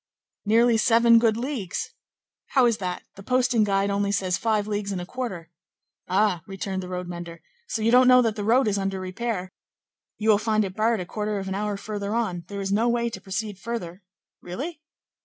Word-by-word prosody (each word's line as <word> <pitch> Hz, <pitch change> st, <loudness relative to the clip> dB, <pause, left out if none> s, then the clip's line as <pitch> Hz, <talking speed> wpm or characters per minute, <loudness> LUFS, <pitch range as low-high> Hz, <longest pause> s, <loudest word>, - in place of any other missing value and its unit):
"Nearly 230 Hz, +2 st, +4 dB
seven 230 Hz, 0 st, +5 dB
good 225 Hz, -2 st, +2 dB
leagues." 235 Hz, -7 st, -3 dB, 0.6 s
"How 260 Hz, -3 st, +4 dB
is 230 Hz, -2 st, +2 dB
that? 180 Hz, -2 st, -4 dB
the 195 Hz, -, -12 dB
posting 250 Hz, 0 st, +2 dB
guide 200 Hz, -1 st, +1 dB
only 200 Hz, 0 st, 0 dB
says 185 Hz, -2 st, 0 dB
five 215 Hz, +1 st, 0 dB
leagues 205 Hz, -1 st, -3 dB
and 190 Hz, -, -2 dB
a 175 Hz, -, -5 dB
quarter." 190 Hz, -8 st, -5 dB, 0.6 s
"Ah!" 190 Hz, -2 st, +2 dB
returned 195 Hz, -1 st, -4 dB
the 180 Hz, -, -7 dB
road 180 Hz, -1 st, -4 dB
mender, 170 Hz, -2 st, -8 dB, 0.2 s
"so 220 Hz, -, -2 dB
you 230 Hz, -, +3 dB
don't 250 Hz, +1 st, +6 dB
know 250 Hz, 0 st, +7 dB
that 225 Hz, -2 st, 0 dB
the 210 Hz, -, -4 dB
road 240 Hz, +4 st, +3 dB
is 200 Hz, -1 st, +1 dB
under 195 Hz, -1 st, -2 dB
repair? 185 Hz, 0 st, -4 dB, 0.7 s
You 220 Hz, +1 st, 0 dB
will 205 Hz, -, +4 dB
find 215 Hz, -1 st, +1 dB
it 190 Hz, -1 st, -7 dB
barred 220 Hz, -1 st, +1 dB
a -, -, -5 dB
quarter 210 Hz, +2 st, -3 dB
of 195 Hz, -1 st, -4 dB
an 190 Hz, -, -2 dB
hour 205 Hz, +1 st, -2 dB
further 205 Hz, +1 st, -4 dB
on; 185 Hz, -7 st, -2 dB
there 200 Hz, -1 st, -5 dB
is 195 Hz, 0 st, -3 dB
no 225 Hz, +4 st, +2 dB
way 235 Hz, 0 st, 0 dB
to 190 Hz, -, -7 dB
proceed 195 Hz, +1 st, -4 dB
further." 210 Hz, -6 st, -5 dB, 0.4 s
"Really?" 290 Hz, -, -6 dB
210 Hz, 205 wpm, -25 LUFS, 190-230 Hz, 0.7 s, know